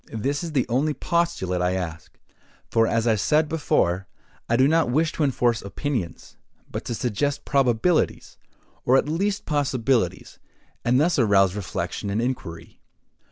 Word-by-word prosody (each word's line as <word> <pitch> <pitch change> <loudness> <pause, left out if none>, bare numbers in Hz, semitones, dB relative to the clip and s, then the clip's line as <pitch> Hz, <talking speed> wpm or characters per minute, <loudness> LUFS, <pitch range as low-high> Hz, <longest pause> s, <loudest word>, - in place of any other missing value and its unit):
This 135 +8 -2
is 165 -2 -5
the 130 -4 +1
only 140 +5 0
postulate 165 - -1
I 90 0 +1
ask; 85 -3 -6 0.5
for, 115 0 +3
as 115 0 0
I 115 - +4
said 150 +9 +2
before, 95 - 0 0.4
I 115 - +3
do 130 +3 +4
not 160 -2 +2
wish 155 +5 +1
to 155 - -2
enforce 120 -4 +1
opinions, 100 - -5 0.3
but - - -4
to 120 - -3
suggest 140 +6 -2
probabilities, 135 +5 +1 0.4
or 130 - +4
at - - +1
least 195 +6 -1
possibilities, 130 - 0 0.4
and 125 +2 +3
thus 160 0 +2
arouse 100 -5 +4
reflection 100 0 -4
and 100 +2 -1
inquiry. 115 -9 -5
125 Hz, 150 wpm, -24 LUFS, 100-150 Hz, 0.5 s, I